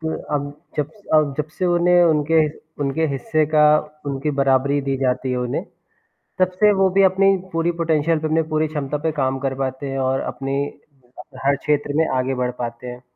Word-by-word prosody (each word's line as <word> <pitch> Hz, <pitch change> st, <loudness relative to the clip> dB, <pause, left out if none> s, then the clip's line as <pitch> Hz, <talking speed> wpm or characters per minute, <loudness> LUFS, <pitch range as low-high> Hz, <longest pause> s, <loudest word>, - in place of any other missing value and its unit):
तो 160 Hz, 0 st, -2 dB, 0.2 s
अब, 145 Hz, 0 st, -2 dB, 0.3 s
जब 150 Hz, 0 st, -1 dB
स -, -, -22 dB
अब 150 Hz, -3 st, +3 dB
जब 150 Hz, 0 st, -2 dB
से 185 Hz, -, 0 dB
उन्हें 175 Hz, 0 st, +4 dB
उनके 155 Hz, -1 st, +2 dB
ह -, -, -4 dB, 0.3 s
उनके 145 Hz, +3 st, 0 dB
हिस्से 150 Hz, +3 st, 0 dB
का 155 Hz, 0 st, +4 dB, 0.4 s
उनकी 140 Hz, +2 st, -2 dB
बराबरी 135 Hz, +1 st, +2 dB
दी 135 Hz, 0 st, -1 dB
जाती 130 Hz, 0 st, 0 dB
है 125 Hz, -, -1 dB
उन्हें। 125 Hz, -1 st, -2 dB, 0.7 s
तब 185 Hz, 0 st, +3 dB
से 210 Hz, -1 st, +6 dB
वो 190 Hz, -, +5 dB
भी 195 Hz, +1 st, +3 dB
अपनी 190 Hz, +1 st, +1 dB, 0.3 s
पूरी 165 Hz, +1 st, +1 dB
पोटेंशियल 160 Hz, 0 st, +1 dB
पे, 155 Hz, -, -3 dB
अपनी 160 Hz, +1 st, +2 dB
पूरी 155 Hz, 0 st, +1 dB
क्षमता 150 Hz, -1 st, -3 dB
पे 160 Hz, -, +1 dB
काम 130 Hz, 0 st, 0 dB
कर 135 Hz, 0 st, -2 dB
पाते 130 Hz, +1 st, -4 dB
हैं 135 Hz, -, -3 dB
और 135 Hz, -, 0 dB
अपनी 135 Hz, 0 st, -4 dB
अ, 130 Hz, -5 st, -17 dB, 0.2 s
हर 140 Hz, 0 st, +4 dB
क्षेत्र 145 Hz, 0 st, -1 dB
में 160 Hz, 0 st, +3 dB
आगे 130 Hz, +1 st, 0 dB
बढ़ 125 Hz, -, 0 dB
पाते 120 Hz, 0 st, -5 dB
हैं। 125 Hz, 0 st, -8 dB
145 Hz, 205 wpm, -21 LUFS, 135-160 Hz, 0.7 s, से